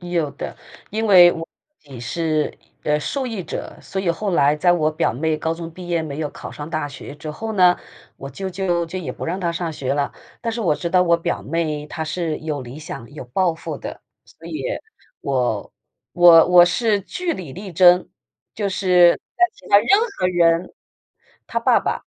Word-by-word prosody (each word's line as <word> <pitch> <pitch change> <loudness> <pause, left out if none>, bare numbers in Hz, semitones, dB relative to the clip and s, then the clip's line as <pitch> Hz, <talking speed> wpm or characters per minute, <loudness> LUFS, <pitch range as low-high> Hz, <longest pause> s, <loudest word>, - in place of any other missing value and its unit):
有 175 -4 -1
的， 145 - -7 0.3
因 220 +2 -1
为 180 -4 +8
我 165 0 -6 0.3
自 150 - -27
己 130 -3 -8
是， 155 +5 -1 0.3
呃， 150 0 +1
受 265 - -3
益 225 -6 -4
者， 165 - -6
所 190 - -4
以 185 -3 +1
后 195 +4 -2
来 145 -2 +3
在 175 +3 +4
我 155 -3 +2
表 155 +2 0
妹 155 +6 -1
高 160 +1 -2
中 165 0 -7
毕 180 +2 -10
业 170 -2 0
没 150 -2 -6
有 155 -2 -2
考 - - -9
上 145 +1 -8
大 155 -3 -2
学 140 0 -9
之 150 +1 -7
后 220 +9 -5
呢， 180 -3 +5 0.4
我 135 - -8
舅 190 +8 -5
舅 180 -2 0
就 185 +3 -5
也 180 - -5
不 - - -7
让 175 +3 -2
她 170 -3 -1
上 170 -1 -3
学 140 -2 -2
了。 145 -1 -1 0.3
但 230 - -2
是 235 - -4
我 175 -8 +2
知 170 +3 -4
道 180 0 +4
我 170 -1 +3
表 165 - -3
妹 155 -1 -2
她 160 - -5
是 160 0 -2
有 150 -3 -4
理 125 +3 -9
想、 135 -6 -8
有 145 - -8
抱 170 +7 +1
负 165 - -6
的， - - -8 0.2
所 - - -16
以 - - -5 0.6
我 125 -6 -1 0.4
我 170 -2 +8
我 180 -1 +8
是 210 +3 +1
据 350 - -3
理 175 - -7
力 190 +3 -8
争， 180 +1 +5 0.5
就 205 -2 -1
是 180 -3 +5 0.2
在 360 - +5
其 - - -17
他 200 - +7
任 - - -3 0.3
何 - - +2
人 170 -1 +2 0.7
她 - - -2
爸 - - +4
爸 - - -3
170 Hz, 220 characters per minute, -21 LUFS, 150-185 Hz, 0.7 s, 为